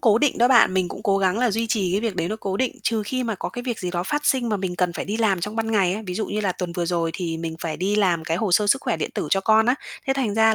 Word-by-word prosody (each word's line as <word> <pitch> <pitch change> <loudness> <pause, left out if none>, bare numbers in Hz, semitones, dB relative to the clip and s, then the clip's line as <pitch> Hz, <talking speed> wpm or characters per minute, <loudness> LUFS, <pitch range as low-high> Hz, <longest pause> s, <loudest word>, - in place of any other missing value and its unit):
cố 220 -2 +4
định 290 +1 +1
đó 240 +1 +5
bạn. 235 -7 +5
Mình 185 -2 +1
cũng - - -8
cố 195 -1 +2
gắng 190 +1 +1
là 245 -1 +2
duy 225 +3 -1
trì 205 -6 0
cái 195 - +1
việc 225 -4 -2
đấy 170 -1 -1
nó 215 - -3
cố 195 -1 -2
định, 255 +2 -1
trừ 225 -2 0
khi 255 +5 -2
mà 225 -2 -1
có 190 - -4
cái 245 - -6
việc 245 -3 -3
gì 180 - -3
đó 175 -1 -2
phát 295 +10 -2
sinh 255 -3 +2
mà 215 - +1
mình 185 -2 -4
cần 180 -1 +1
phải - - -4
đi 205 +4 -3
làm 210 -5 +1
trong 210 +5 -4
ban 225 0 -1
ngày 195 -4 +3
ấy. 215 - -5
Ví 180 - -4
dụ 215 +3 -2
như 210 - -2
là 200 -3 0
tuần 180 -1 -5
vừa 175 0 -2
rồi 170 -1 0
thì 170 -3 -3
mình 160 0 -4
phải 160 -2 -3
đi 200 +3 0
làm 180 -6 +2
cái 165 0 -1
hồ 195 0 -1
sơ 210 +3 +4
sức 270 +7 +3
khỏe - - 0
điện - - -3
tử - - -2
cho 195 - +3
con 220 +2 +4
á. 245 - +4 0.3
Thế 270 - +2
thành 255 -7 -1
ra 220 0 +4
205 Hz, 355 wpm, -23 LUFS, 180-225 Hz, 0.3 s, đó